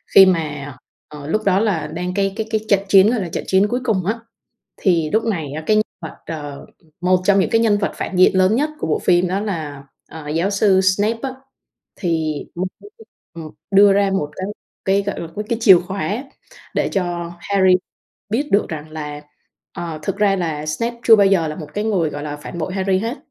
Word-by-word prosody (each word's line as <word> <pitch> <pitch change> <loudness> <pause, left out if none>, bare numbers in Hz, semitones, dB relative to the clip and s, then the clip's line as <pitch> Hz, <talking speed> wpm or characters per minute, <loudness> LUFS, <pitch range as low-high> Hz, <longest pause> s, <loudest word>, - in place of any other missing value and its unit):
khi 195 - +10
mà, 150 -6 -1 0.3
ờ, 150 -1 -10
lúc 215 +6 0
đó 195 0 +3
là 185 -9 0
đang 180 +3 -4
cái 195 0 0
cái 220 -1 -3
cái 220 - +1
trận 200 -2 +4
chiến 195 +2 +6
đó 245 - 0
là 185 -5 -3
trận - - -4
chiến 195 +2 +3
cuối 245 +3 -1
cùng 205 -7 0
á. 220 +4 -1 0.6
Thì 165 -6 +1
lúc 220 +1 +1
này 165 -11 -2
á, 155 +1 -5
cái 215 - +3
nhân 215 - +4 0.2
vật, 160 - -7
ờ, 145 -3 -7 0.3
một 180 0 +3
trong 200 0 +4
những - - 0
cái 225 - +3
nhân 210 -3 +3
vật 200 - -1
phản 190 - -4
diện 185 - +5
lớn 185 +3 +4
nhất 300 +3 +1
của - - -3
bộ 155 - +1
phim 175 0 +2
đó 195 +2 -1
là, 155 -9 -5 0.2
ờ, 155 -2 -9
giáo 165 +6 0
sư 195 -1 +3
Snape 205 +4 +1
á, 265 -1 -3 0.6
thì 160 -4 -1 0.2
ông 180 +2 -2 0.2
ấy 410 - -13 0.4
mới, 165 - -7
ừm, 155 - -11 0.2
đưa 200 0 +6
ra 200 0 +2
một 150 -6 -1
cái 185 - -4 0.4
cái, 195 +1 +2
gọi 200 - -4
là, 170 - -6 0.2
cái 230 - -1
chìa 195 -6 +8
khóa 195 - -3 0.5
để - - +1
cho 175 -3 -3
Harry 190 -1 +3 0.6
biết 280 +7 -1
được 200 - +2
rằng 155 -1 -6
là, 150 -1 -6 0.5
ờ, 165 -3 -5
thực 200 - -2
ra 205 -2 +3
là 160 -4 -3
Snape 230 +10 -3
chưa 225 - +8
bao 200 -2 +5
giờ 185 -5 +2
là 155 - -5
một 155 -2 -8
cái 210 - -2
người, 190 -8 +1
gọi 145 0 -6
là, 150 -1 -4
phản 170 - -8
bội 170 +3 -3
Harry 190 -1 +1
hết. 230 +6 -3
190 Hz, 225 wpm, -20 LUFS, 160-205 Hz, 0.6 s, khi